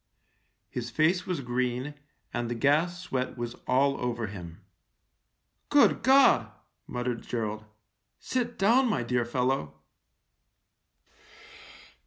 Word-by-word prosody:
His 120 -1 -4
face 165 +9 +1
was 180 -6 -2
green, 125 +2 -2 0.4
and 120 -1 -2
the 120 - -2
gas 160 +8 +1
sweat 130 -8 -3
was 120 0 -4
all 135 +2 +2
over 120 -2 -2
him. 90 -5 -9 1.1
"Good 290 -1 +4
God!" 265 +3 +5 0.4
muttered 125 -1 -3
Gerald. 110 -2 -4 0.5
"Sit 240 -2 -3
down, 235 +7 +4
my 170 - 0
dear 120 0 0
fellow." 125 - -1
125 Hz, 105 wpm, -28 LUFS, 120-175 Hz, 1.1 s, God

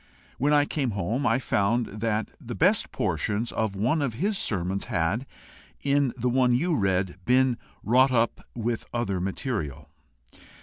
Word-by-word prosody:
When 145 +4 +2
I 145 -1 +5
came 135 -7 -1
home, 110 +10 0
I - - +3
found 120 -1 +1 0.2
that 110 -1 0
the - - -7
best - - +3
portions 110 +3 -1
of 110 -3 -1
one 125 +11 +1
of 130 -6 -1
his 200 - 0
sermons 95 - -2
had, 85 +11 -1 0.6
in 140 -2 +2
the 125 +1 -1
one 125 0 +3
you 170 +6 +1
read, 95 -4 0
been 125 -1 +3 0.2
wrought 130 +4 +4
up 115 -2 +1
with 115 0 -2
other 100 -6 -1
material. 95 - -3
120 Hz, 155 wpm, -26 LUFS, 100-130 Hz, 0.6 s, I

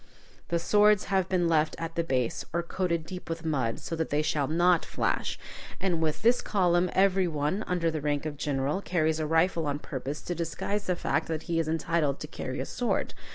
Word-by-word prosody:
The 170 - +1
swords 210 +4 +4
have 190 -1 +2
been 180 -2 +2
left 155 -1 +2
at 165 0 -4
the 170 - 0
base, 130 -7 -1
or 170 0 0
coated 170 -2 -1
deep 180 0 -8
with 165 0 -4
mud, 130 -8 0
so 165 - -4
that 160 0 -2
they 150 +1 +1
shall 145 -2 0
not 175 +1 +3
flash, - - -1 0.4
and 180 -4 0
with 155 +2 -1
this 240 +2 +4
column 180 -3 +2
every 190 -1 +3
one, 155 +6 -1
under 170 -2 +1
the 155 -1 -3
rank 145 0 -1
of 155 -1 -3
general, 145 +4 -1
carries 160 -4 +1
a 155 - -1
rifle 165 0 +2
on 145 0 0
purpose 140 0 -5
to 175 - -2
disguise 170 +5 -3
the 180 - +2
fact 160 -2 -1
that 160 -1 -3
he 165 -1 -1
is 165 - 0
entitled 160 -3 0
to 150 - -5
carry 130 -3 -5
a - - -2
sword. 245 - -1
165 Hz, 210 wpm, -28 LUFS, 150-180 Hz, 0.4 s, swords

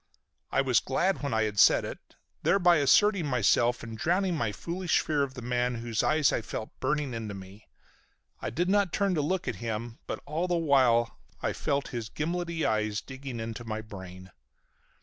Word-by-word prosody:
I - - +2
was 130 -3 +3
glad 180 +8 0
when 140 -2 -2
I 110 0 +2
had 105 -2 -2
said - - +6
it, - - -6 0.4
thereby 175 -3 +4
asserting 180 +4 +4
myself 120 -1 +2
and 115 -1 -7
downing 180 - +1
my 115 -8 -1
foolish 175 - -1
fear 150 -2 0
of 140 -1 -2
the 125 - -7
man 125 0 0
whose 115 -1 -1
eyes 155 -2 +3
I - - 0
felt 110 0 -6
burning 145 -1 -1
into 110 -3 -5
me. 95 +2 -12 0.7
I - - -2
did 170 +11 -1
not 195 -2 +2
turn 200 -2 +1
to 155 - +1
look 185 +5 -1
at - - -2
him 115 0 -5
but - - -3
all 165 +4 -2
the 175 - +1
while 130 -7 +3 0.2
I - - 0
felt 140 -1 -1
his 115 -3 -5
gimlety 170 +2 -2
eyes 110 -1 0
digging 130 -1 -7
into 115 +1 -5
my 110 -1 -4
brain. 95 -3 -10
130 Hz, 190 wpm, -28 LUFS, 115-165 Hz, 0.7 s, said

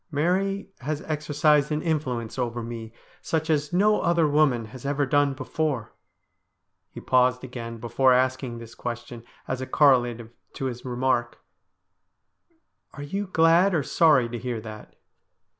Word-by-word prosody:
Mary 195 +6 -1
has 150 +3 -4
exercised 150 -1 +1
an 150 0 -1
influence 130 -8 -2
over 120 -1 -2
me 115 -1 -7 0.3
such 160 0 -1
as 150 -1 0
no 210 +4 +3
other 170 -2 +2
woman 145 -6 +2
has 120 +3 -12
ever 145 0 0
done 145 0 +2
before.' 135 -2 -3 1.0
He - - -10
paused 125 0 +2
again 115 -2 -7
before 120 +3 +2
asking 130 -1 +1
this 115 0 -10
question, 120 0 -7 0.2
as 130 0 -3
a 130 - -4
correlative 120 -5 +2 0.2
to 135 - -5
his 125 -1 -4
remark: 125 -1 -1 0.8
' 330 -1 -45
Are 145 - -7
you 195 +8 -3
glad 170 +2 +4
or 155 - +1
sorry 145 -5 +4
to 120 0 -5
hear 120 -1 -3
that 110 -1 -10
130 Hz, 145 wpm, -25 LUFS, 120-155 Hz, 1.0 s, glad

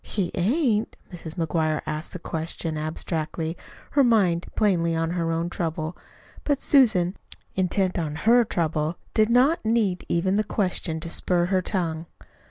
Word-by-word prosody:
"He 195 -4 -2
ain't?" 225 - +1 0.2
Mrs. 165 -2 -7
McGuire 160 -2 0
asked 155 +2 -4
the - - -6
question 160 -1 -4
abstractedly, 160 +1 -3 0.4
her 280 - +4
mind 195 -8 +3
plainly 170 -6 +2
on 165 0 0
her 170 -2 -1
own 165 +1 -1
trouble; 165 -2 -3 0.5
but 285 -2 +1
Susan, 215 -10 +4 0.4
intent 185 0 +1
on 155 -3 -3
HER 235 +9 +4
trouble, 160 -5 -1 0.2
did 215 0 +3
not 260 +7 +4
need 220 -5 +1
even 185 +3 +1
the 215 - +2
question 180 -6 -1
to 165 - -5
spur 175 0 +1
her 185 - +3
tongue. 170 -4 -2
175 Hz, 150 wpm, -25 LUFS, 165-210 Hz, 0.5 s, her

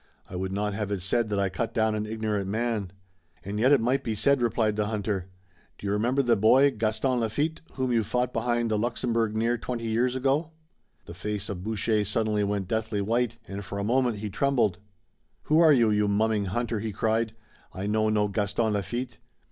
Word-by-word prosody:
I 90 - -9
would 95 +1 -3
not 105 +1 -1
have 105 -1 -3
it 95 -3 -2
said 110 +4 +1
that 105 - -1
I 100 -1 +1
cut 110 +5 -3
down 110 -1 +2
an 105 0 -2
ignorant 110 -3 -2
man." 110 -2 -1 0.6
"And 100 +2 -3
yet 130 +5 +4
it 145 - +6
might 130 +4 +1
be 110 -2 -2
said," 140 +5 +2
replied 110 -2 +1
the 105 -1 0
hunter. 100 -3 -2 0.5
"Do - - -10
you 100 - 0
remember 120 +6 +1
the 120 -2 +3
boy, 130 +7 +5
Gaston 110 +2 0
Lafitte, 145 +9 -1
whom 130 -1 -1
you 115 -2 +2
fought 125 +3 -1
behind 120 0 0
the 105 - +1
Luxembourg 115 -1 0
near 115 +2 +1
twenty 115 0 -4
years 120 +3 +1
ago?" 140 +5 +1 0.6
The - - -9
face 100 +3 -4
of 95 -3 -4
Boucher 110 0 0
suddenly 105 +1 0
went 100 -2 -1
deathly 110 0 -1
white, 115 +2 0
and, 100 +1 -6
for 100 - -6
a 100 - -2
moment, 120 0 +1
he 105 0 -5
trembled. 120 -7 +1 0.6
"Who 155 +2 +3
are 165 -2 +7
you, 120 -6 +4
you 105 0 +2
mumming 105 0 +1
hunter?" 115 +3 -2
he 110 +1 -3
cried. 110 +2 0 0.4
"I 95 - -5
know 110 +1 +1
no 105 -1 +2
Gaston 105 +2 0
Lafitte." 120 +6 -3
110 Hz, 205 wpm, -27 LUFS, 105-120 Hz, 0.6 s, are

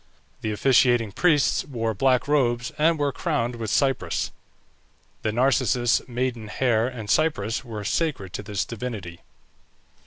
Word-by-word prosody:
The 110 - -2
officiating 120 -1 +3
priests 150 - +2
wore 115 -8 -2
black 130 +5 +2
robes, 120 -5 +1
and 160 +2 +3
were 145 -1 0
crowned 125 -6 -2
with 110 -2 -4
cypress. 135 +2 0 0.9
The 110 - -1
narcissus, 120 -1 +2
maiden 120 -3 -3
hair, 115 +1 +1
and 120 -5 -7
cypress 115 -5 +1
were 110 -4 -6
sacred 110 - -2
to - - -4
this 100 -1 -3
divinity. 105 -8 -6
120 Hz, 130 wpm, -24 LUFS, 110-135 Hz, 0.9 s, officiating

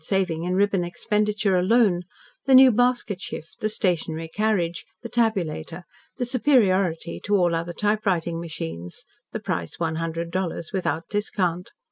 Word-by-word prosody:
saving 175 -2 0
in 180 +1 0
ribbon 200 -2 +2
expenditure 210 +2 0
alone, 190 -1 +3 0.4
the 270 -1 +6
new 260 0 +9
basket 240 -4 +1
shift, 170 +1 -8
the 215 - 0
stationary 165 -6 -1
carriage, 175 -5 -1 0.2
the - - -4
tabulator, 190 -7 -1 0.3
the 245 - -1
superiority 200 - +2
to 205 - +1
all 175 -3 +3
other 165 +1 -2
typewriting 190 -4 0
machines 85 - -6 0.3
the - - -4
price 85 -1 -4
one 160 -2 -1
hundred 165 +1 -3
dollars 175 -3 -3
without 175 -3 -2
discount. 185 -4 -1
185 Hz, 140 wpm, -24 LUFS, 165-210 Hz, 0.4 s, new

